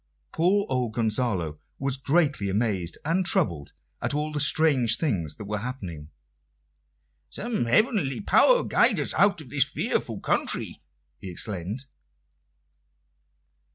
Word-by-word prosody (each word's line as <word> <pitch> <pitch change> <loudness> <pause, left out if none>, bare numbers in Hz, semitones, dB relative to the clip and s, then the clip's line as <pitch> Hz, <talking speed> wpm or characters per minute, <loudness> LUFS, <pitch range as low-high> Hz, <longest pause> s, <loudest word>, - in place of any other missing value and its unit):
Poor 190 +5 +2
old 125 -4 -1
Gonzalo 105 - 0 0.2
was 135 -1 -1
greatly 140 - +1
amazed 95 -4 -1
and 175 +5 +1
troubled 85 - -1 0.3
at - - 0
all 150 +1 -1
the 150 - -2
strange 140 -6 +3
things 85 - -1
that 105 - -9
were 105 +1 -3
happening. 95 - -7 1.2
"Some 225 - -3
heavenly 185 - +2
power - - +4
guide - - +3
us - - -1
out 200 -4 +3
of 130 -5 -13
this 140 -3 +4
fearful 140 - -2
country!" - - -1 0.4
he 95 - -8
exclaimed. 100 +6 -4
125 Hz, 120 wpm, -26 LUFS, 100-155 Hz, 1.2 s, power